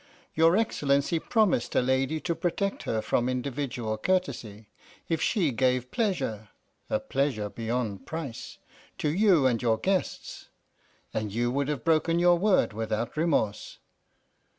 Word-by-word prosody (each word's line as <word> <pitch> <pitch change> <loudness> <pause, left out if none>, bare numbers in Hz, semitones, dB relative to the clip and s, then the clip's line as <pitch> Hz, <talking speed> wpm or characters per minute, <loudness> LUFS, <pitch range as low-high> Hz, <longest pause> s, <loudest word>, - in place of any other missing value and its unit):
Your 165 +4 +4
Excellency 145 -7 +1
promised 210 - +1
a - - +5
lady 130 +4 +1
to 170 - -1
protect 175 +4 -2
her 110 -1 0
from 120 +1 +1
individual 125 -4 -3
courtesy, 120 - -2 0.4
if 165 -2 -1
she 175 - +1
gave 125 0 0
pleasure 145 - -2 0.4
a - - +1
pleasure 130 -7 -1
beyond 115 -3 -3
price 155 -7 -6 0.4
to 150 - 0
you 180 -5 +4
and 120 -3 +2
your 115 -2 +2
guests, 190 - -2 0.6
and 110 -2 -2
you 120 +3 0
would 140 +1 0
have 145 -6 -3
broken 165 +1 +2
your 175 0 +4
word 195 - +3
without 110 +1 -3
remorse. 150 -10 0
140 Hz, 135 wpm, -27 LUFS, 115-170 Hz, 0.6 s, a